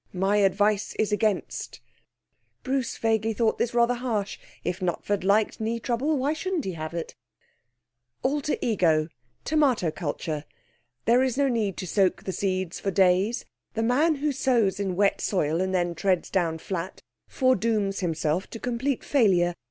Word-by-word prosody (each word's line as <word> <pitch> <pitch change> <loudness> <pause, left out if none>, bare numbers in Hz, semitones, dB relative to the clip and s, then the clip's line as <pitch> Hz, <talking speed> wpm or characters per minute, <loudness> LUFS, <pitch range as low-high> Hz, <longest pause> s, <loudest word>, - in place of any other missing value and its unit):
My 195 +3 +1
advice 205 +1 +2
is 215 -1 0
against.' 210 -1 -1 0.8
(Bruce 260 -2 -1
vaguely 225 0 +1
thought 225 0 +1
this 240 0 -1
rather 235 +1 +4
harsh. 230 -5 -2 0.2
If 180 +2 -2
Knutford 190 +2 -1
liked 205 +2 +2
knee 230 +2 -1
trouble, 260 +6 0
why 275 +3 +1
shouldn't 350 0 -2
he 190 - -2
have 160 -1 -6
it?) 170 - -4 1.1
'Alter 290 +3 0
Ego 165 -8 +2 0.4
(Tomato 270 - +2
culture). 155 -2 -4 0.6
There's 250 +1 +3
no 280 -1 +3
need 215 -6 -1
to - - -4
soak 185 +1 +1
the 190 - -3
seeds 185 -3 -2
for 200 - -2
days. 190 +4 +2 0.3
The 225 - 0
man 290 +8 +3
who 295 +1 -1
sows 240 -8 +1
in 190 -3 -1
wet 200 +1 +2
soil 165 -3 0
and 190 0 0
then 175 -2 0
treads 185 +1 0
down 170 -4 +1
flat 185 +2 -5 0.2
foredooms 220 -6 +1
himself 165 0 -1
to 230 - -8
complete 250 +3 -2
failure. 185 -10 +3
205 Hz, 150 wpm, -26 LUFS, 185-240 Hz, 1.1 s, rather